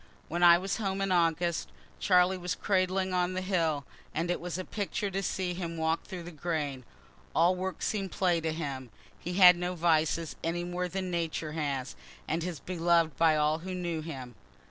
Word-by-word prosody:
When 175 +1 -2
I 170 -1 +8
was 190 +2 -2
home 195 -3 -2
in 195 -1 0
August, 170 -1 +1 0.3
Charlie 180 -1 +4
was 180 0 -2
cradling 185 -1 0
on 180 0 +1
the 185 - -1
hill, 165 -7 0 0.3
and 170 +2 0
it - - -2
was 175 0 -4
a 185 - -4
picture 205 -1 -3
to 195 +1 -1
see 185 -2 -2
him 170 -2 -4
walk 160 +1 0
through 185 -3 -7
the 175 - -8
grain. 150 -5 -3 0.5
All 170 +3 +4
work 185 +1 -4
seem'd 195 -3 -1
play 175 -3 +1
to 160 0 -1
him. 140 -6 -4 0.3
He 175 - -5
had 180 -2 +9
no 180 +1 -2
vices, 160 -1 +1
any 170 +1 -1
more 180 +1 -2
than 185 0 -3
Nature 165 -2 -2
has, 140 -5 -3 0.3
and 165 +2 -1
was 175 -4 -4
belov'd 170 -2 +1
by 160 -1 +5
all 150 +1 +2
who 185 +2 -5
knew 170 -3 -2
him. 135 -6 -7
175 Hz, 190 wpm, -30 LUFS, 160-185 Hz, 0.5 s, had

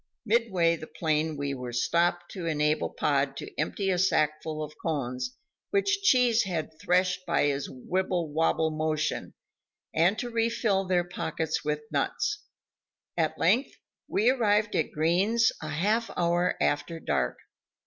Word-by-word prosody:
Midway 195 -7 +2
the 155 - -9
plain 155 -1 -1
we 140 0 -2
were 125 -2 -5
stopped 175 +7 +1
to 180 -4 -5
enable 150 -1 +1
Pod 140 -1 0
to - - -7
empty 195 +5 0
a 180 - +1
sackful 155 -3 +1
of 150 0 -7
cones, 125 -5 -3 0.3
which 400 0 +1
Cheese 250 - +4
had 170 -5 -3
threshed 180 +1 +1
by - - +2
his 140 -1 -1
wibble 175 +4 -2
wobble 160 0 +2
motion, 155 0 -2 0.6
and 175 +6 +3
to 240 +1 -4
refill 230 -4 +1
their 180 -1 +2
pockets 165 -2 -3
with 150 0 -1
nuts. 420 0 -1 0.7
At - - 0
length, 260 +4 +2 0.3
we 225 +5 +3
arrived 210 -4 +2
at 155 - 0
Green's 190 +9 +2
a 155 - -5
half 210 +9 0
hour 175 +1 +2
after 165 +3 0
dark. - - -1
170 Hz, 140 wpm, -28 LUFS, 155-205 Hz, 0.7 s, Cheese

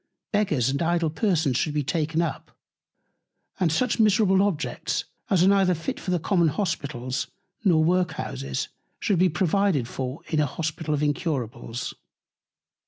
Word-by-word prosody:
Beggars 155 - +2
and 140 +3 -1
Idle 170 -1 +1
Persons 160 - +1
should 150 +1 -1
be 150 - +1
taken 160 +2 0
up, 160 - -4 1.1
and 175 -4 +2
such 250 +9 +1
miserable 205 -3 +4
Objects, 195 -6 -1 0.2
as 185 -5 +4
are - - +5
neither 195 -2 +4
fit 165 +1 -4
for - - -6
the 180 - +2
common 170 0 +2
Hospitals, 140 - -2 0.4
nor 165 -6 +4
Work 180 0 +2
houses, 70 - -4 0.3
should 195 -5 +1
be 185 0 +5
provided 180 - +1
for 130 +3 -5
in 155 - -1
an 150 - +3
Hospital 155 +1 -2
of 145 - -1
Incurables. 125 - -2
165 Hz, 150 wpm, -25 LUFS, 145-185 Hz, 1.1 s, are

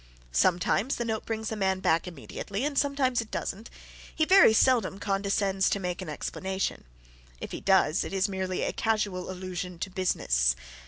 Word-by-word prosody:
Sometimes 180 - +2
the 235 - -3
note 220 -1 -3
brings 220 -1 -3
the 220 - -3
man 190 -2 0
back 165 -1 +1
immediately 195 - -5
and 295 -1 -2
sometimes 275 -4 +1
it 225 - -10
doesn't. 215 +4 -4 0.5
He 315 - +2
very 380 - +7
seldom 220 -4 +3
condescends 195 -1 0
to 200 - 0
make 180 -2 -3
an - - -6
explanation. 190 +5 -3 0.5
If - - -7
he - - -6
does, 190 -3 +3
it - - -6
is 195 0 +1
merely 190 -2 -2
a - - -1
casual 210 -5 -1
allusion 180 -1 -5
to 190 +3 -4
"business." - - +1
195 Hz, 170 wpm, -28 LUFS, 185-220 Hz, 0.5 s, very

